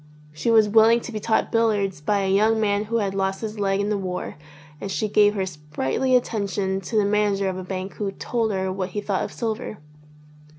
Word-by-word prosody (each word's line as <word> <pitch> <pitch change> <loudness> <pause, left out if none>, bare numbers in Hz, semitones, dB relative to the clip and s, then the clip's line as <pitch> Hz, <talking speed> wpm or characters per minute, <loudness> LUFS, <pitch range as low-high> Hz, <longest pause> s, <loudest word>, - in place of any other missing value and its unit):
She 155 +9 -2
was 220 -2 +5
willing 225 +2 +5
to 240 - -7
be 215 - -4
taught 220 +1 0
billiards 205 -7 +1
by 200 +6 +1
a 190 0 +1
young 220 +3 +3
man 205 -1 +1
who 230 +2 -1
had 200 -3 -1
lost 195 0 -1
his 215 -1 -5
leg 195 -1 +1
in 200 +1 0
the 210 -1 0
war 180 -1 -4 0.5
and 200 - -4
she 215 +3 -1
gave 210 0 +4
her 190 -2 0
sprightly 150 - -1
attention 200 -5 0
to 205 +5 -6
the 210 - +4
manager 205 -1 +1
of 185 -1 -2
a - - -6
bank 185 +1 -5
who 200 -2 -2
told 225 +1 -1
her 190 -1 -1
what 185 -1 -3
he - - +2
thought 200 -2 -1
of - - -5
silver. 220 -2 -4
205 Hz, 220 wpm, -23 LUFS, 190-220 Hz, 0.5 s, was